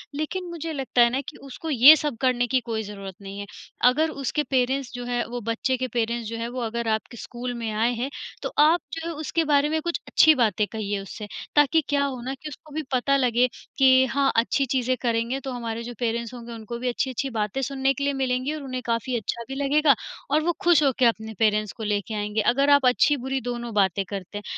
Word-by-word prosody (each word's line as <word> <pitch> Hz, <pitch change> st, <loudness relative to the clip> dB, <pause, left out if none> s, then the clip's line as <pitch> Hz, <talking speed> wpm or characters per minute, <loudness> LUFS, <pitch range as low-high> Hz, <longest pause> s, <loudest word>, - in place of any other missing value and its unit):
लेकिन 310 Hz, +5 st, -3 dB
मुझे 330 Hz, -1 st, -5 dB
लगता 265 Hz, -3 st, +1 dB
है 235 Hz, -, +6 dB
ना 260 Hz, +3 st, -1 dB
कि 310 Hz, -, -13 dB
उसको 275 Hz, +4 st, -7 dB
ये 280 Hz, +2 st, +9 dB
सब 295 Hz, -5 st, -3 dB
करने 250 Hz, -2 st, +2 dB
की 260 Hz, +2 st, +2 dB
कोई 220 Hz, -1 st, -1 dB
ज़रूरत 195 Hz, -2 st, -8 dB
नहीं 200 Hz, 0 st, -8 dB
है। 205 Hz, -, -5 dB, 0.4 s
अगर 310 Hz, +6 st, +1 dB
उसके 295 Hz, 0 st, -2 dB
पेरेंट्स 260 Hz, 0 st, 0 dB
जो 245 Hz, -1 st, -6 dB
हैं, 245 Hz, 0 st, -1 dB
वो 240 Hz, +1 st, -5 dB
बच्चे 230 Hz, +4 st, -1 dB
के 255 Hz, +1 st, -2 dB
पेरेंट्स 235 Hz, -1 st, -2 dB
जो 230 Hz, -, -5 dB
हैं 230 Hz, 0 st, -3 dB
वो 250 Hz, +1 st, -5 dB
अगर 235 Hz, 0 st, -3 dB
आपके 230 Hz, +2 st, -8 dB
स्कूल 245 Hz, +2 st, -6 dB
में 230 Hz, -2 st, -4 dB
आए 225 Hz, +3 st, +1 dB
हैं, 245 Hz, +3 st, -3 dB, 0.3 s
तो -, -, -2 dB
आप 315 Hz, +4 st, +5 dB
जो 325 Hz, 0 st, -4 dB
है 335 Hz, -, -3 dB
उसके 315 Hz, +2 st, -1 dB
बारे 285 Hz, +1 st, +4 dB
में 315 Hz, +1 st, 0 dB
कुछ 340 Hz, +1 st, -2 dB
अच्छी 315 Hz, -1 st, +6 dB
बातें 215 Hz, -5 st, +2 dB
कहिए 205 Hz, -2 st, -3 dB
उससे। 205 Hz, +2 st, -8 dB, 0.3 s
ताकि 295 Hz, +2 st, +5 dB
क्या 285 Hz, -1 st, +2 dB
हो 260 Hz, -3 st, -4 dB
ना 260 Hz, +2 st, -4 dB
कि 275 Hz, +3 st, -8 dB
उसको 300 Hz, +1 st, -13 dB
भी 315 Hz, -, -2 dB
पता 260 Hz, +2 st, +2 dB
लगे, 250 Hz, -1 st, +3 dB, 0.3 s
कि 260 Hz, -1 st, +6 dB
हाँ, 270 Hz, +2 st, +1 dB
अच्छी 240 Hz, +4 st, +2 dB
चीज़ें 255 Hz, 0 st, 0 dB
करेंगे, 235 Hz, +2 st, 0 dB
तो 270 Hz, 0 st, -6 dB
हमारे 230 Hz, -2 st, -4 dB
जो 245 Hz, +1 st, -6 dB
पेरेंट्स 235 Hz, 0 st, -2 dB
होंगे 240 Hz, -1 st, -9 dB
उनको 230 Hz, +1 st, -7 dB
भी 250 Hz, -, -3 dB
अच्छी-अच्छी 260 Hz, +2 st, -2 dB
बातें 220 Hz, +1 st, -2 dB
सुनने 270 Hz, +1 st, 0 dB
के 280 Hz, -, -4 dB
लिए 280 Hz, 0 st, +1 dB
मिलेंगी 260 Hz, +1 st, -1 dB
और 310 Hz, -, -5 dB
उन्हें 255 Hz, -2 st, -4 dB
काफ़ी 230 Hz, +2 st, -1 dB
अच्छा 235 Hz, +1 st, -4 dB
भी 270 Hz, -, -6 dB
लगेगा 285 Hz, +1 st, +3 dB, 0.4 s
और 305 Hz, +2 st, +3 dB
वो 345 Hz, -, +2 dB
खुश 345 Hz, -3 st, +5 dB
हो 275 Hz, -, +4 dB
के 255 Hz, -, +5 dB
अपने 220 Hz, -1 st, 0 dB
पेरेंट्स 215 Hz, -2 st, +2 dB
को 225 Hz, -, -6 dB
लेके 205 Hz, +1 st, -2 dB
आएँगे, 210 Hz, +1 st, -1 dB
अगर 275 Hz, +7 st, +2 dB
आप 285 Hz, -2 st, +5 dB
अच्छी-बुरी 265 Hz, +1 st, +2 dB
दोनों 240 Hz, -1 st, -4 dB
बातें 195 Hz, -2 st, +2 dB
करते 200 Hz, 0 st, -6 dB
हैं। 205 Hz, -, -7 dB
250 Hz, 230 wpm, -24 LUFS, 230-275 Hz, 0.4 s, ये